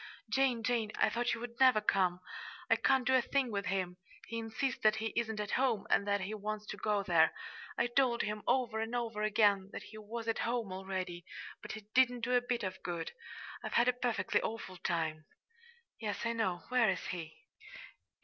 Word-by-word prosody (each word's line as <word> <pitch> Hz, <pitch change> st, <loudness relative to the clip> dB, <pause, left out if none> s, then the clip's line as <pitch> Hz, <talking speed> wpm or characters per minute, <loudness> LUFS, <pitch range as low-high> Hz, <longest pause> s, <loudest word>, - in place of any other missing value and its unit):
"Jane, 260 Hz, -4 st, +2 dB
Jane, 225 Hz, -3 st, 0 dB
I -, -, +3 dB
thought 240 Hz, 0 st, 0 dB
you -, -, -8 dB
would 235 Hz, -1 st, -7 dB
never 255 Hz, -4 st, +7 dB
come! 185 Hz, -4 st, +1 dB, 0.5 s
I -, -, +8 dB
can't 265 Hz, -2 st, +3 dB
do 260 Hz, -, +3 dB
a 260 Hz, -, +6 dB
thing 260 Hz, 0 st, 0 dB
with 200 Hz, -1 st, -2 dB
him. 180 Hz, -2 st, -1 dB, 0.3 s
He 230 Hz, +1 st, -2 dB
insists 230 Hz, +3 st, -2 dB
that 215 Hz, 0 st, +5 dB
he 220 Hz, 0 st, -3 dB
isn't 220 Hz, -2 st, -1 dB
at 210 Hz, 0 st, -3 dB
home, 250 Hz, -6 st, +1 dB
and 200 Hz, -, +3 dB
that 200 Hz, -1 st, +2 dB
he 195 Hz, +3 st, -3 dB
wants 215 Hz, 0 st, -4 dB
to -, -, -6 dB
go 210 Hz, -2 st, 0 dB
there. 165 Hz, -4 st, +4 dB, 0.4 s
I 235 Hz, -, +3 dB
told 240 Hz, -1 st, +2 dB
him, 210 Hz, 0 st, -3 dB
over 240 Hz, -4 st, +2 dB
and 225 Hz, +2 st, -2 dB
over 230 Hz, -3 st, -2 dB
again, 205 Hz, -2 st, +3 dB
that -, -, -6 dB
he 215 Hz, -, -11 dB
was 225 Hz, +2 st, -6 dB
at 225 Hz, -, 0 dB
home 235 Hz, -4 st, -1 dB
already, 185 Hz, -2 st, -4 dB, 0.4 s
but -, -, -6 dB
it 215 Hz, 0 st, -15 dB
didn't 250 Hz, -2 st, +4 dB
do 245 Hz, +2 st, 0 dB
a 245 Hz, -, +5 dB
bit 245 Hz, -2 st, -2 dB
of 190 Hz, 0 st, -4 dB
good. 170 Hz, -2 st, -4 dB, 0.5 s
I've -, -, -4 dB
had 235 Hz, -, +4 dB
a 250 Hz, -, +5 dB
perfectly 240 Hz, -6 st, 0 dB
awful 220 Hz, -4 st, -5 dB
time." 160 Hz, -3 st, -2 dB, 0.7 s
"Yes, 215 Hz, 0 st, -3 dB
I 230 Hz, -, +1 dB
know. 190 Hz, -6 st, -1 dB
Where 250 Hz, -3 st, +4 dB
is 190 Hz, -, -1 dB
he?" 165 Hz, -3 st, -5 dB
220 Hz, 205 wpm, -34 LUFS, 195-240 Hz, 0.7 s, I